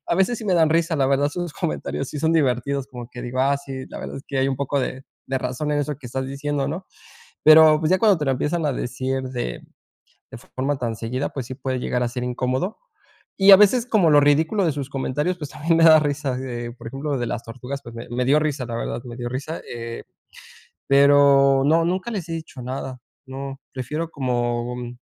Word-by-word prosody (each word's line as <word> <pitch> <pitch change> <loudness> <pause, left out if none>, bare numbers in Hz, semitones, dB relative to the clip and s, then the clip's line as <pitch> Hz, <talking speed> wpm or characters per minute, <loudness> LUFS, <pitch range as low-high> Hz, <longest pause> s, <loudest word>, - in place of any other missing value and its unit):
a - - +1
veces 190 +6 +1
sí 225 - -8
me 190 -3 +2
dan 160 -2 +4
risa, 165 +1 +2
la 135 -3 +2
verdad, 140 +1 +2
sus 175 0 -4
comentarios 155 -5 -3
sí 150 - -6
son 160 +1 +2
divertidos, 140 -2 +1
como 125 -3 -9
que 120 - -8
digo: 125 +1 -3
"Ah, 140 +1 +3
sí, 135 -2 -7
la - - -8
verdad - - -6
es - - -11
que 135 - -2
hay 130 - +2
un 135 - -1
poco 140 +1 -1
de 130 0 -3 0.2
de 135 0 -1
razón 130 +3 -3
en 145 - +1
eso 145 0 -2
que 135 -2 -11
estás 130 +2 -3
diciendo, 140 +1 -2
¿no?", 175 +5 -5 0.6
pero, 155 0 +8
pues, 155 - 0
ya 185 - +4
cuando 205 -6 +4
te 150 - -2
lo 135 - +3
empiezan 150 +5 -1
a 145 - +1
decir 130 +2 -3
de 125 - -4 0.7
de - - -8
forma 135 +3 -3
tan 120 -3 -3
seguida, 125 +5 -3
pues 130 -4 -5
sí 130 - -6
puede 130 0 -3
llegar 125 0 -1
a 120 - 0
ser 125 +1 -5
incómodo, 130 - -2 0.6
y 195 0 +8
a 195 - +12
veces, 220 +4 +4
como 195 -9 +3
lo 145 - +7
ridículo 160 +8 +3
de 160 - +1
sus 140 -1 -5
comentarios, 145 +6 -2
pues, 150 -4 -6
también 165 +2 0
me 165 - +5
da 160 -1 +9
risa, 145 -2 -1
así 130 - -4
de, 120 -2 -5
por 120 -1 -10
ejemplo, 140 +3 -3
de 120 - -1
las 115 0 -3
tortugas, 130 +4 -7
pues, 115 - -11
me 115 - -7
me 125 +1 -1
dio 145 +3 +5
risa, 145 -5 -2
la 115 - -4
verdad, 115 - -3
me 120 -1 -8
dio 120 -1 -4
risa, 145 +5 -5
eh, 115 0 -6 0.9
pero 140 -1 +5
no, 165 +3 +3
nunca 185 +7 -1
les 185 -5 -4
he - - -4
dicho 160 -6 -8
nada, 130 0 -5 0.3
no, 135 +1 -7
prefiero 150 +6 -4
como, 120 -2 -1
mm, 120 0 -7
140 Hz, 235 wpm, -22 LUFS, 125-155 Hz, 0.9 s, a